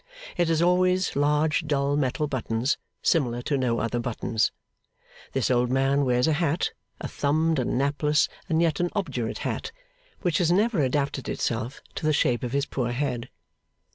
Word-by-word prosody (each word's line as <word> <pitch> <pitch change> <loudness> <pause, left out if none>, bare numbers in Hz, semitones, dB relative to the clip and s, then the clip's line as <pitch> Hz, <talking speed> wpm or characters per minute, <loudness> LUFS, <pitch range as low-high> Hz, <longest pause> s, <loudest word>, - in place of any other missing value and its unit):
It 175 -1 +2
has 165 0 +2
always 185 +1 +2
large 150 +2 +2
dull 140 -1 +1
metal 145 +1 0
buttons, 125 -2 -1 0.2
similar 120 -7 +1
to 145 - 0
no 125 -3 +1
other 115 +2 -1
buttons. 115 -1 0 0.8
This 135 -1 +1
old 125 0 +2
man 135 +2 +2
wears 125 -1 +2
a 160 - +3
hat, 160 +1 0 0.3
a - - -4
thumbed 155 +2 +1
and 125 - 0
napless 145 +2 +2 0.2
and 165 0 +3
yet 160 -3 +1
an 175 0 +1
obdurate 125 - -2
hat, - - -3 0.5
which 175 -4 +1
has 170 -2 +2
never 205 -1 +2
adapted 140 0 -1
itself 120 +3 -2
to 155 - -3
the 155 - +3
shape 120 -4 +2
of 125 - -3
his 140 +1 +1
poor 120 -4 -2
head. 125 -2 -2
140 Hz, 170 wpm, -26 LUFS, 125-160 Hz, 0.8 s, a